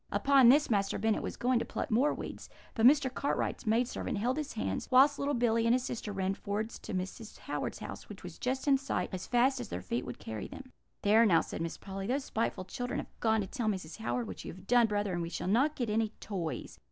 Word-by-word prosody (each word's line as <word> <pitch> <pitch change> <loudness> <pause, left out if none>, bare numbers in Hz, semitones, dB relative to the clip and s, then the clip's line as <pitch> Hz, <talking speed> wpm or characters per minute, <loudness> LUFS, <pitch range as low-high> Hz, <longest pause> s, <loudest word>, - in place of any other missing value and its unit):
Upon 275 -3 +5
this 290 +1 +5
Master 200 -2 +1
Bennet 220 -1 +1
was - - -5
going 250 0 +2
to - - -1
pluck - - -4
more 255 +7 +4
weeds, - - -7 0.2
but 225 +2 +5
Mr. 275 -2 +4
Cartwright's 280 -3 -2
maid 230 +3 +3
servant 230 - -3
held 245 +5 0
his 305 -1 -3
hands, 95 - -3
whilst 275 +3 +6
little 285 0 0
Billy 230 -1 +2
and 235 - +5
his 255 - -1
sister 230 -4 -4
ran 190 -1 -1
forwards 210 +3 -4
to 200 - -6
Mrs. 190 +4 -5
Howard's - - -4
house, - - -8
which - - -10
was - - -9
just 260 +3 -2
in 275 -1 +5
sight, 275 - -2
as 185 - -4
fast 255 +2 +3
as 240 - -6
their 90 - -5
feet 120 +7 -2
would 125 - -7
carry 110 -2 -6
them. 265 -1 -11 0.3
"'There, 215 +3 +6
now,' 170 -5 +5
said - - -6
Miss 165 0 -3
Polly, 195 0 -6
'those 265 +3 -1
spiteful 220 -4 -2
children 245 +5 -4
have - - -9
gone 220 -1 +2
to 195 - -4
tell 235 +2 -3
Mrs. 185 -6 -4
Howard 120 +1 -1
what 90 -3 -7
you - - -6
have 190 +2 -13
done, 240 +1 +5
brother, 205 -2 -1
and 175 - -1
we 165 - -3
shall - - -4
not 265 +10 +3
get 245 - -2
any 220 +1 +1
toys. 175 -6 -5
225 Hz, 245 wpm, -31 LUFS, 190-255 Hz, 0.3 s, whilst